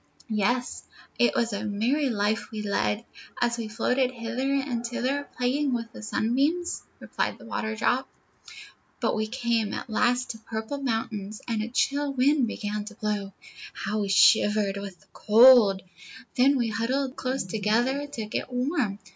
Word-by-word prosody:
"Yes; 235 +4 0 0.4
it 240 - +3
was 230 -2 +1
a 200 +1 -3
merry 235 +8 0
life 210 -1 0
we 215 -1 -5
led, 210 +2 -1 0.3
as 235 -1 +1
we 225 - -3
floated 250 +4 +1
hither 250 +2 -3
and 270 -4 -1
thither, 260 +4 -2
playing 260 +2 +1
with 230 -1 -5
the - - -9
sun 220 +1 -1
beams," 325 +7 0 0.2
replied - - -2
the - - -14
Waterdrop. 220 +4 -1 0.9
"But - - +1
we 215 0 -1
came 235 -3 -1
at 240 - -6
last 245 +3 +1
to 225 - -10
a - - -27
purple 220 +6 -5
mountain, 225 -5 -3
and 225 -2 -1
a 215 - -3
chill 280 +3 0
wind 270 0 +3
began 210 -1 -3
to 215 0 -9
blow. 205 -2 -3 0.4
How 215 +2 -3
we 200 -1 -1
shivered 205 0 +4
with 195 -3 -7
the 150 - -25
cold! 220 -4 +6 0.5
Then 270 +3 +4
we 235 -2 0
huddled 255 +5 -1
close 260 +1 -2
together 225 +9 0
to 230 -6 -5
get 215 - -4
warm. 250 - -1
230 Hz, 165 wpm, -26 LUFS, 215-260 Hz, 0.9 s, cold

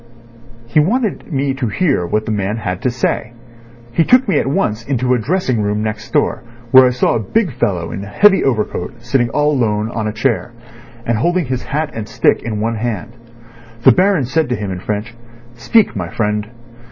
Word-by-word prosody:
He 120 +6 +2
wanted 215 - 0
me 140 -1 0
to 130 -2 -2
hear 130 - 0
what 110 +5 -1
that - - -3
man 105 +1 -1
had 90 -4 -4
to - - +1
say. 120 -1 -2 0.6
He 165 - +2
took 250 +7 +4
me 195 - +2
at - - -1
once 125 - 0
into 125 0 0
a 125 - +2
dressing 130 - 0
room 105 +1 -1
next 110 0 -4
door, - - +1 0.3
where 130 -1 +8
I - - +3
saw 125 0 +1
a 115 - 0
big 175 - 0
fellow 90 -8 -1
in 100 - -5
a - - -8
heavy 195 - +4
overcoat 115 -2 -2
sitting 120 0 +1
all 150 +5 +1
alone 110 -5 0
on 110 -2 -2
a - - -1
chair, 120 +1 -1 0.5
and 115 -2 0
holding 175 +5 +1
his 130 -1 -3
hat 150 +1 -3
and 110 -2 -5
stick - - +2
in 110 -2 -4
one 115 +1 -1
hand. 115 -1 -3 0.7
The 130 - +8
Baron 185 +1 +2
said 155 +3 0
to 125 - 0
him 105 -3 -4
in 90 - -4
French 105 +4 -4 0.4
'Speak, 195 - +2
my 90 -4 -3
friend. 105 +1 -2
120 Hz, 200 wpm, -17 LUFS, 105-140 Hz, 0.7 s, where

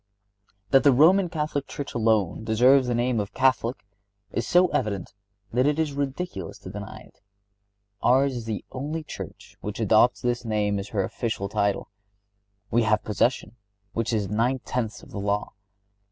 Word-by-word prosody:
That 135 - +6
the 140 - +7
Roman 175 +8 +5
Catholic 150 -3 -2
Church 145 - -6
alone 110 -4 +1
deserves 125 +4 +4
the 120 - 0
name 120 0 +1
of 105 0 -4
Catholic 130 -3 +1 0.5
is 115 - -2
so 180 +1 +5
evident 100 -4 -2 0.4
that 125 +3 +3
it 150 0 +1
is 155 -3 0
ridiculous 140 - -4
to - - -8
deny - - -8
it. - - -30 0.8
Ours 135 +1 +3
is 120 -2 -5
the 110 -3 -4
only 150 +5 -4
Church - - -9
which 105 +2 -5
adopts 110 +3 +4
this 120 -1 0
name 105 -3 0
as 100 - -5
her 100 -2 -1
official 110 -2 -3
title. 100 -1 -1 0.8
We 120 - +3
have 110 -1 +2
possession, 110 +2 0 0.4
which 115 +1 -1
is 105 -3 0
nine 115 +6 +1
tenths 110 -4 -3
of - - -15
the 100 - -5
law. 100 +1 -1
120 Hz, 165 wpm, -25 LUFS, 105-135 Hz, 0.8 s, the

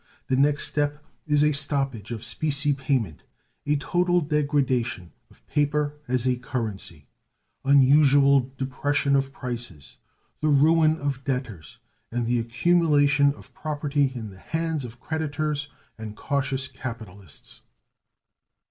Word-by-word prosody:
The 130 - +2
next 145 +2 +3
step 145 0 -2 0.2
is 150 -1 +3
a 150 - +4
stoppage 135 -7 -1
of 115 -2 -5
specie 145 0 0
payment 130 - -1 0.5
a 150 - +3
total 175 +4 +1
degradation 140 - 0 0.2
of - - -23
paper 145 0 0
as 125 0 0
a 125 -1 +2
currency 105 - -5 0.6
unusual 140 -1 +5
depression 140 +1 0
of 135 0 +1
prices, 120 - -7 0.4
the 155 - 0
ruin 155 +2 +4
of 140 -3 -3
debtors, 125 - -4 0.3
and 120 0 -1
the 120 +1 +1
accumulation 145 +2 +3
of - - -17
property 145 -2 -1
in 110 -4 -6
the 95 - -15
hands 160 0 -2
of 120 0 -11
creditors 150 -1 -2 0.3
and 110 -1 -7
cautious 135 -1 -1
capitalists. 110 - -10
140 Hz, 120 wpm, -25 LUFS, 125-150 Hz, 0.6 s, unusual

